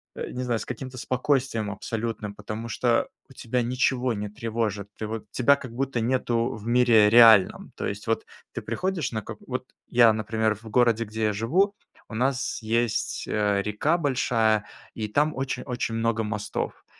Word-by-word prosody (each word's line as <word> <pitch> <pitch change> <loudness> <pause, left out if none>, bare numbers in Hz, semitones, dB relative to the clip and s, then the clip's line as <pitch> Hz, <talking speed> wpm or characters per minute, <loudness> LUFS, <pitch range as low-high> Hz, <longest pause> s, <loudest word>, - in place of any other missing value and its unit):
э, - - -5
не 125 - -4
знаю, 120 -3 0
с - - -6
каким-то 130 +1 -7
спокойствием 125 -3 0
абсолютным, 110 0 -4
потому 110 +2 -6
что 115 +1 +1 0.2
у - - -15
тебя 125 0 -2
ничего 125 +1 +1
не 105 -1 -4
тревожит. 105 -2 -3
Ты 110 - -4
вот, 110 -1 -6
тебя 140 +3 +4
как 130 -4 -9
будто 135 0 -1
нету 120 0 0
в 110 0 -10
мире 120 -3 +5
реальном. 115 -4 +6
То - - -4
есть 100 +3 -5
вот 115 - 0 0.3
ты - - -4
приходишь 185 -8 -2
на 110 -1 -3
какой - - -10
Вот - - -3 0.2
я, 120 -2 +5
например, 110 0 0
в 110 +2 -12
городе, 115 0 +3
где 110 +1 -4
я 105 - +1
живу, 180 - +1 0.3
у 110 - -8
нас 130 +2 0
есть, 115 0 -1
э, 105 -2 +1
река 105 +11 0
большая, 115 -8 +1 0.3
и 110 -1 -4
там 150 +7 +1
очень 135 0 -3
очень 120 -3 -3
много 115 0 0
мостов. 105 -1 -4
115 Hz, 175 wpm, -26 LUFS, 110-125 Hz, 0.3 s, реальном